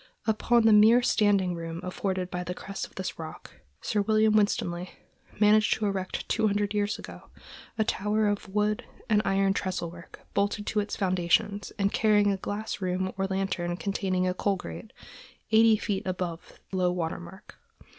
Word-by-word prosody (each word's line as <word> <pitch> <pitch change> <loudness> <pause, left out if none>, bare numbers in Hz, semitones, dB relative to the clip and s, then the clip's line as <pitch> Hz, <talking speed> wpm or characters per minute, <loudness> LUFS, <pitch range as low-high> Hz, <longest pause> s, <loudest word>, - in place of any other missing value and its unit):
Upon 230 +2 +3
the 220 - +7
mere 220 +4 +6
standing 205 -6 +2
room 165 -1 -5
afforded 185 0 -3
by 180 0 -3
the 180 +1 -5
crest 195 +1 -6
of - - -25
this 190 -2 -5
rock, 160 -1 -9 0.2
Sir 210 - 0
William 215 +1 +3
Winstanley 180 -4 +1 0.5
managed 215 0 +5
to 220 - -2
erect, 195 -2 -3
two 220 - +2
hundred 205 0 0
years 205 0 0
ago, - - -11 0.5
a 220 - +3
tower 210 +1 0
of 205 -1 -2
wood 210 +1 0 0.3
and 210 -1 +5
iron 195 0 +2
trestle 185 -3 -3
work, 170 -1 -13
bolted 205 +1 0
to 215 - 0
its 205 0 -2
foundation 185 +2 +1 0.2
and 200 0 +1
carrying 210 -2 +3
a 195 - -1
glass 205 +2 -4
room 185 0 -1
or 195 0 -1
lantern 190 -3 -2
containing 185 -2 -1
a 180 - +1
coal 200 +2 0
grate, 85 - -8 0.6
eighty 220 0 +6
feet 200 -2 -2
above 180 -2 -4 0.2
low 185 -2 +1
water 170 -2 -2
mark. 175 +3 -13
195 Hz, 170 wpm, -28 LUFS, 180-210 Hz, 0.6 s, the